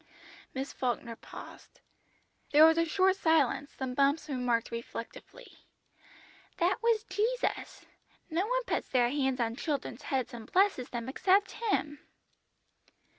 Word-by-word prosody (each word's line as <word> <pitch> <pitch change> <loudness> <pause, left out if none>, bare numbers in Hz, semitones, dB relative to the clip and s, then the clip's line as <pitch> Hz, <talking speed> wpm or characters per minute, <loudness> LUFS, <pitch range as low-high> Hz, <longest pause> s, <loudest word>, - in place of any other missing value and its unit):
Miss 270 +1 -4
Falkner 240 -2 -2
paused. - - -12 0.7
There 300 +2 +8
was 320 +1 +5
a 335 - +3
short 375 +3 +2
silence, 295 -5 +2
then 260 -1 -3
Bumps 280 +4 +2
remarked 250 -5 0
reflectively 230 0 -8 1.1
"That 360 +3 +1
was 455 -2 +2
Jesus; 445 +6 -2 0.4
no 350 +5 -1
one - - 0
puts - - -2
their 245 -2 +3
hands 265 -2 0
on 230 -1 0
children's 275 -4 -3
heads 265 -1 -2
and 230 -2 -9
blesses 375 -10 +2
them 235 -1 -5
except 385 +8 +2
Him!" 305 -10 -1
290 Hz, 125 wpm, -30 LUFS, 250-375 Hz, 1.1 s, There